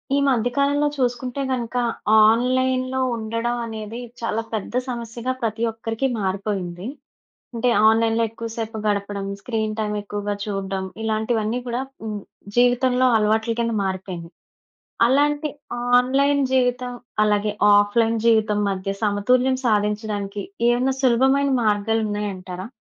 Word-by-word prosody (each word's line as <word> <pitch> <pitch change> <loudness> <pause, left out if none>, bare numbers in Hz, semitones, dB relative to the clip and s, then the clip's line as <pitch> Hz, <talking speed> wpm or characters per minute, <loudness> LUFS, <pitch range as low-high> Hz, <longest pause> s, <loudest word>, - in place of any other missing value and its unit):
ఈ - - +3
మధ్య 245 -3 +2
కాలంలో 285 +1 +2
చూసుకుంటే 250 0 -1
గనుక, 245 -1 -3 0.5
ఆన్‌లైన్‌లో 255 +2 +1 0.2
ఉండడం 230 +2 -2
అనేది, 220 +1 -6 0.2
చాలా 225 -1 -1
పెద్ద 215 0 -4
సమస్యగా 235 0 -4
పతి 225 +1 -1
ఒక్కరికి 225 +3 -2
మారిపోయింది. 190 -1 -3 0.7
అంటే, 235 +2 +1 0.2
ఆన్‌లైన్‌లో 225 +1 +2
ఎక్కువ 225 +1 -7
సేపు 225 -1 -4
గడపడం, 200 -1 -1
స్క్రీన్ 220 -2 -2
టైమ్ 210 -1 -1
ఎక్కువగా 205 0 -3
చూడడం, 195 -2 -3 0.2
ఇలాంటివన్నీ 220 +1 0
కూడా 240 +1 -1 0.2
హ్మ్, 210 -1 -3 0.4
జీవితంలో 250 +1 +4
అలవాట్ల 220 +2 +1
కింద 230 -1 0
మారిపోయినియి. 185 -3 -5 0.7
అలాంటి 290 +3 +2 0.5
ఆన్‌లైన్ 275 +3 +3
జీవితం, 250 -1 +1 0.3
అలాగే 210 0 +1 0.2
ఆఫ్‌లైన్ 225 +3 +2
జీవితం 220 -2 +3
మధ్య 195 0 -2
సమతుల్యం 250 +6 +2
సాధించడానికి, 210 -1 -1 0.3
ఏవేనా 250 +2 +2
సులభమైన 265 +3 +3
మార్గాలున్నాయంటారా? 205 -3 -1
225 Hz, 110 wpm, -22 LUFS, 210-250 Hz, 0.7 s, జీవితంలో